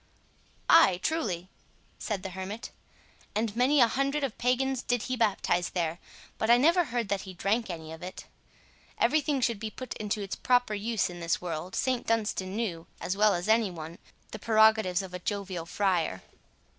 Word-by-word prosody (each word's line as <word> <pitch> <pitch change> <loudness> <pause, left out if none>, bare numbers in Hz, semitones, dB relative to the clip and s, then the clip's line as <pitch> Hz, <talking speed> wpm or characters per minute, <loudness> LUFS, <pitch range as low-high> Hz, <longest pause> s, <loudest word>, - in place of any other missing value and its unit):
"Ay, 195 - +6
truly," 195 - -1 0.5
said 205 -4 -3
the 190 - -5
hermit, 190 +4 -6 0.6
"and 215 0 -1
many 260 +5 +3
a 240 - +7
hundred 275 +4 0
of 265 -5 -2
pagans 255 +1 +1
did 245 -2 -1
he 255 - -2
baptize 195 -6 +1
there, 170 -1 -2 0.4
but 220 - 0
I 240 - +8
never 335 +7 +4
heard 240 -4 -2
that 200 -1 0
he 190 -2 -9
drank 210 +5 0
any 160 -2 -6
of 160 - -10
it. 180 +1 -8 0.7
Every 310 - +3
thing 285 -2 -1
should 235 -3 +1
be 220 0 -4
put 255 +4 -9
to 210 -1 -3
its 195 - -4
proper 245 -3 +2
use 215 +1 0
in 175 - -9
this 170 -1 0
world. 175 +1 -5
St 255 -2 0
Dunstan 210 -4 -1
knew, 180 -8 -3
as 180 - -2
well 210 -1 +4
as 175 +2 -3
any 220 -1 +4
one, 165 -1 -8 0.3
the 215 - -7
prerogatives 220 -4 +4
of 185 -1 -9
a 180 - -4
jovial 190 -3 -4
friar." 175 - 0
210 Hz, 180 wpm, -29 LUFS, 180-240 Hz, 0.7 s, I